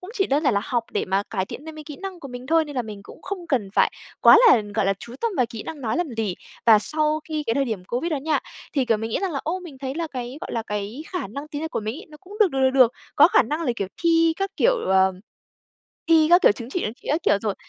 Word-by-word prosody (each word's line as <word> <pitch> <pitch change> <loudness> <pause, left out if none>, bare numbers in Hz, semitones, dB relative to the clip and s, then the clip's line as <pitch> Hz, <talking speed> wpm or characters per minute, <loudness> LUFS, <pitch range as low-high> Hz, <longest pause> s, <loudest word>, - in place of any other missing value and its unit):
cũng 365 - -9
chỉ 390 -4 +1
đơn 285 +3 +1
giản 260 -6 +3
là 200 - +2
học 240 -2 -1
để - - 0
mà 195 +1 0
cải 190 -4 -1
thiện 290 - -9
thêm 315 - -7
cái 310 - -9
kỹ 295 -1 -9
năng 380 -2 -7
của 275 - -8
mình 250 +1 -8
thôi, 325 +1 +3
nên 290 -3 -9
là 250 - +1
mình 210 -2 -8
cũng - - -14
không 375 -3 -6
cần 245 -10 0
phải - - +3 0.3
quá - - +9
là, 230 - +6
gọi 215 -3 +1
là, 195 - +2
chú 235 +4 -10
tâm 465 -2 0
vào 250 - +2
kỹ 225 -2 -8
năng 305 -3 -7
nói 230 +3 -1
làm 350 -3 -1
gì. 215 -5 -1 0.3
Và 220 -2 +8
sau 305 +5 0
khi 305 -1 -2
cái 230 - +1
thời 275 - +1
điểm 220 -7 -4
Covid 255 - -2
đó - - +1
nha, 300 +3 0 0.3
thì, 275 -4 +1
kiểu, 230 -2 +2
mình 225 +1 -4
nghĩ - - 0
rằng 385 -3 -2
là, 275 - -2
ô, 360 +4 -2
mình 305 -7 -11
thấy 265 0 -4
là 335 0 -2
cái, 255 -2 -6
gọi - - -6
là, 230 - -1
cái 210 +5 -5
khả 360 - -3
năng 280 +9 -8
tiếng 295 0 -5
Nhật 320 - -4
của - - -2
mình 215 +3 -4
ấy, - - -11
nó 300 - -13
cũng 395 +2 -12
được 405 -4 +5
được, 270 -2 -2
được 260 - +5
được, 255 -2 +5 0.2
có - - +8
khả - - +5
năng 305 +3 -3
là, 260 -7 0
kiểu, 195 - -3
thi 330 -1 +4
các, 390 0 -2
kiểu, - - +4
ờ, 190 0 +4 1.0
thi 320 -2 +6
các, 350 +2 +6
kiểu, - - +7
chứng 230 +3 -8
chỉ, 360 - -2
chứng 215 - -2
chỉ - - -13
các 310 +4 +1
kiểu 200 - +3
rồi. 210 -3 -1
275 Hz, 310 wpm, -23 LUFS, 225-325 Hz, 1.0 s, quá